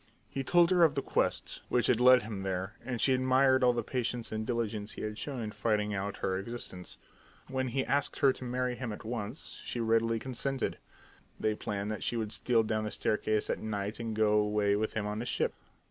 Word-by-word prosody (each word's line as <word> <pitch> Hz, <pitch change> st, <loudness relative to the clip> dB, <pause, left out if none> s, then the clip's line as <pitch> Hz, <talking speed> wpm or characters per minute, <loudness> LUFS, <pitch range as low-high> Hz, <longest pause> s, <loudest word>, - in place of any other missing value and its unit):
He 135 Hz, -, -4 dB
told 175 Hz, +5 st, +4 dB
her 180 Hz, -2 st, +5 dB
of 155 Hz, -4 st, +4 dB
the 140 Hz, -, -1 dB
quest -, -, -1 dB
which 120 Hz, -2 st, +2 dB
had 120 Hz, -3 st, +3 dB
led 125 Hz, 0 st, +7 dB
him 105 Hz, -3 st, -5 dB
there, 95 Hz, -1 st, -2 dB
and 125 Hz, -1 st, -3 dB
she 135 Hz, -, +4 dB
admired 130 Hz, +1 st, +4 dB
all 125 Hz, -, +6 dB
the 120 Hz, -1 st, -1 dB
patience 120 Hz, -1 st, -2 dB
and 110 Hz, 0 st, -3 dB
diligence 110 Hz, -3 st, -2 dB
he -, -, -6 dB
had 105 Hz, 0 st, -4 dB
shown 135 Hz, -2 st, -4 dB
in 105 Hz, -, -4 dB
finding 105 Hz, 0 st, 0 dB
out 100 Hz, 0 st, -3 dB
her 95 Hz, 0 st, 0 dB
existence. 95 Hz, -4 st, -6 dB, 0.5 s
When 130 Hz, 0 st, -1 dB
he 130 Hz, +2 st, -1 dB
asked 145 Hz, 0 st, +1 dB
her 135 Hz, -2 st, +5 dB
to 130 Hz, -, -9 dB
marry 125 Hz, 0 st, -1 dB
him 120 Hz, -2 st, -4 dB
at 105 Hz, -, -8 dB
once, 115 Hz, +3 st, -5 dB
she 120 Hz, -, -4 dB
readily 115 Hz, 0 st, +2 dB
consented. 130 Hz, +2 st, -2 dB, 0.6 s
They 110 Hz, -, +1 dB
planned 105 Hz, 0 st, -3 dB
that 110 Hz, -, -4 dB
she -, -, -1 dB
should 110 Hz, -2 st, -2 dB
steal 115 Hz, -1 st, +2 dB
down 110 Hz, 0 st, -1 dB
the -, -, -2 dB
staircase 105 Hz, 0 st, 0 dB
at -, -, -2 dB
night 105 Hz, 0 st, -3 dB
and 115 Hz, -2 st, -3 dB
go 110 Hz, -1 st, +3 dB
away 105 Hz, -1 st, +2 dB
with 110 Hz, +1 st, -1 dB
him 110 Hz, -2 st, -1 dB
on 105 Hz, +1 st, -3 dB
his 120 Hz, -, -3 dB
ship. -, -, 0 dB
115 Hz, 220 wpm, -31 LUFS, 105-125 Hz, 0.6 s, led